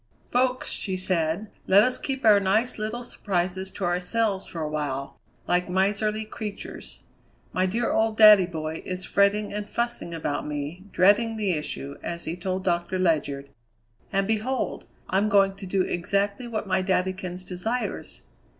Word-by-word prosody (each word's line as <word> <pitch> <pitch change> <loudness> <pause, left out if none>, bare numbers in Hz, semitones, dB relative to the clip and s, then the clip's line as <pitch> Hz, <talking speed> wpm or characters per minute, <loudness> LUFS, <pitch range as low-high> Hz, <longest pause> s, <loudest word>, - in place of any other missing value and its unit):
"Folks," 255 +1 +1
she 190 -3 -2
said, 185 +2 -1 0.2
"let 200 +2 +7
us 255 +2 +1
keep 265 -2 -3
our 210 -2 +7
nice 215 +5 +1
little 220 +3 -3
surprises 190 -4 -2
to 195 - -7
ourselves 190 +3 0
for 170 - -7
a 155 - -1
while, 145 -3 -3 0.3
like 180 0 +1
miserly 210 +3 +1
creatures. 215 -1 -7 0.5
My 185 0 +2
dear 230 +5 0
old 220 0 +1
daddy 210 -4 +9
boy 160 -2 -4
is 185 0 -4
fretting 200 +1 +2
and 210 0 -4
fussing 235 -7 -2
about 150 -3 -2
me, 150 +5 -5
'dreading 215 +5 +4
the 205 -3 +1
issue,' 150 -3 -4
as 170 0 -5
he 165 - -3
told 185 +1 -3
Doctor 175 0 0
Ledyard, 145 -6 0 0.6
and 195 0 +1
behold 225 +4 -1 0.2
I'm 200 +3 +2
going 195 -1 +4
to 195 -1 -8
do 185 0 +1
exactly 200 +7 -1
what 220 -3 -3
my 190 -1 +1
daddykins 185 -1 -2
desires! 220 +7 -4
190 Hz, 155 wpm, -26 LUFS, 175-215 Hz, 0.6 s, daddy